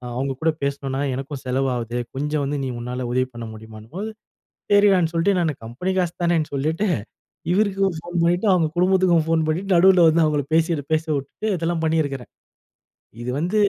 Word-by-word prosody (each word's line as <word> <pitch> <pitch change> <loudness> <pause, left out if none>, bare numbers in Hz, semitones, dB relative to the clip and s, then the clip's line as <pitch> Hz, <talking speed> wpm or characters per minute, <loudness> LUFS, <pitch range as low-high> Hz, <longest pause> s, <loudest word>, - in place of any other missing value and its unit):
அவுங்க 135 +2 -1
கூட 160 - +3
பேசினனா 140 -1 -2 0.2
எனக்கும் 135 +1 -6
செலவாகுது 125 -2 -1 0.2
கொஞ்சம் 150 +2 -1
வந்து 145 +1 -2
நீ 130 - -2
உன்னால 125 +1 -4
உதவி 130 +1 +1
பண்ண 120 -1 -7
முடியுமான்னும்போது." 110 - -8 0.6
சரிடான்னு 195 -5 +5
சொல்லிட்டு 180 +4 +2
நான் 160 -3 +1
கம்பெனி 125 +12 -4
காசு 175 -2 0
தானேன்னு 170 -3 +1
சொல்லிட்டு 155 +8 0 0.7
இவருக்கும் 195 -2 +1
ஃபோன் 175 +2 -7
பண்ணிட்டு 175 +5 +2
அவுங்க 170 -3 +3
குடும்பத்துக்கும் 180 -2 +3
ஃபோன் 165 -1 +2
பண்ணிட்டு 185 +5 -1
நடுவுல 180 0 +6
வந்து 165 +1 +3
அவங்கள 150 -2 +1
பேசி 165 -1 +2 0.2
பேச 155 0 0
விட்டு 140 +10 -5
இதெல்லாம் 165 0 -1
பண்ணியிருக்கிறேன். 145 -5 -1 0.9
இது 120 - -4
வந்து 180 +7 0
160 Hz, 160 wpm, -22 LUFS, 135-175 Hz, 0.9 s, நடுவுல